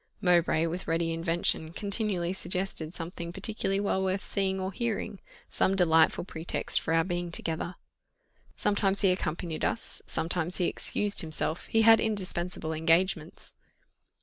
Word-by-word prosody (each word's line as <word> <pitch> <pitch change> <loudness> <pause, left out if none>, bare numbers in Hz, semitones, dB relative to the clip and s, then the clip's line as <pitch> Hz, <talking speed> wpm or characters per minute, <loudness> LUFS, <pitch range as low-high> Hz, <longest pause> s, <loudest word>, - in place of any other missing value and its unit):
Mowbray, 170 -3 +3
with 175 +3 -4
ready 165 0 0
invention, 165 -1 -1
continually 200 -3 -1
suggested 180 -3 -2
something 170 0 -6
particularly 195 +1 -2
well 200 -1 0
worth 190 +1 -1
seeing 190 -1 -1
or 190 0 -3
hearing, 215 -2 -3 0.3
some 190 - +2
delightful 165 -4 +4
pretext 165 -2 -1
for - - -3
our 165 - +4
being 175 -1 -3
together. 170 +1 -2 0.8
Sometimes 200 -1 +1
he 195 -3 +4
accompanied 165 -2 -3
us, 230 - -1
sometimes 175 +1 0
he 180 - +1
excused 205 +3 +2
himself 160 0 -2
he 225 0 +2
had 225 0 +7
indispensable 180 -6 -2
engagements. 165 +4 0
180 Hz, 135 wpm, -29 LUFS, 165-195 Hz, 0.8 s, had